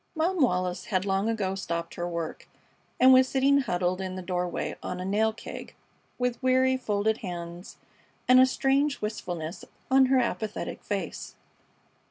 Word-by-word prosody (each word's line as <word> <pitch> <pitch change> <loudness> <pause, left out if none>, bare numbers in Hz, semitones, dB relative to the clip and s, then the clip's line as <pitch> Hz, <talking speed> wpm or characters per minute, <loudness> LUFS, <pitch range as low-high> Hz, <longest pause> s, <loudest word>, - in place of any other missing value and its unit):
Mom 335 +2 0
Wallis 180 -6 +1
had 190 -3 -1
long 195 +2 +1
ago 205 -4 -1
stopped 170 -3 -4
her 175 0 -3
work 170 -2 -5 0.5
and 260 +1 +8
was 260 0 +6
sitting 275 +1 +3
huddled 185 -6 -1
in 185 -1 -4
the 185 - -6
doorway 180 -1 -2
on 180 - -5
a 180 - -4
nail 215 +3 +2
keg 220 - -9 0.4
with 250 -1 -1
weary, 260 0 +3
folded 220 -3 0
hands 175 -1 -7 0.5
and 255 0 +7
a 260 - +7
strange 275 +2 +1
wistfulness 175 -6 -5 0.3
on 265 0 +6
her 265 +1 +3
apathetic 220 -3 -2
face. 195 -6 -4
210 Hz, 155 wpm, -27 LUFS, 180-260 Hz, 0.5 s, and